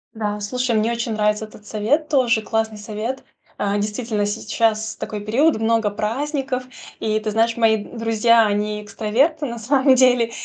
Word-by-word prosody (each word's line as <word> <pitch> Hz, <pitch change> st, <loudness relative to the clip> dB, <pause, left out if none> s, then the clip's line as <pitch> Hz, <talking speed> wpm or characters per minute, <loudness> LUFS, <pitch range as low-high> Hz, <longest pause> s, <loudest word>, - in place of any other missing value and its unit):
Да, 210 Hz, -1 st, -3 dB
слушай, 245 Hz, +3 st, -1 dB
мне 220 Hz, +2 st, +1 dB
очень 235 Hz, -1 st, -2 dB
нравится 210 Hz, 0 st, 0 dB
этот 210 Hz, -1 st, -16 dB
совет, 240 Hz, +10 st, 0 dB
тоже 245 Hz, -6 st, +3 dB
классный 220 Hz, 0 st, -2 dB
совет. 215 Hz, +5 st, -5 dB, 0.4 s
Э, 200 Hz, 0 st, 0 dB
действительно, 210 Hz, 0 st, -2 dB
сейчас 220 Hz, +1 st, -1 dB
такой 210 Hz, -, -5 dB
период, 265 Hz, +9 st, +2 dB
много 225 Hz, -1 st, +1 dB
праздников, 260 Hz, +5 st, -2 dB, 0.4 s
и 215 Hz, 0 st, 0 dB
ты 215 Hz, 0 st, -3 dB
знаешь, 225 Hz, +2 st, +2 dB
мои 220 Hz, -2 st, +3 dB
друзья, 230 Hz, 0 st, +3 dB
они 210 Hz, +1 st, -1 dB
экстраверты 255 Hz, +10 st, 0 dB
на 235 Hz, -3 st, -5 dB
самом 265 Hz, +3 st, +3 dB
деле, 250 Hz, -2 st, +4 dB
225 Hz, 155 wpm, -21 LUFS, 210-245 Hz, 0.4 s, деле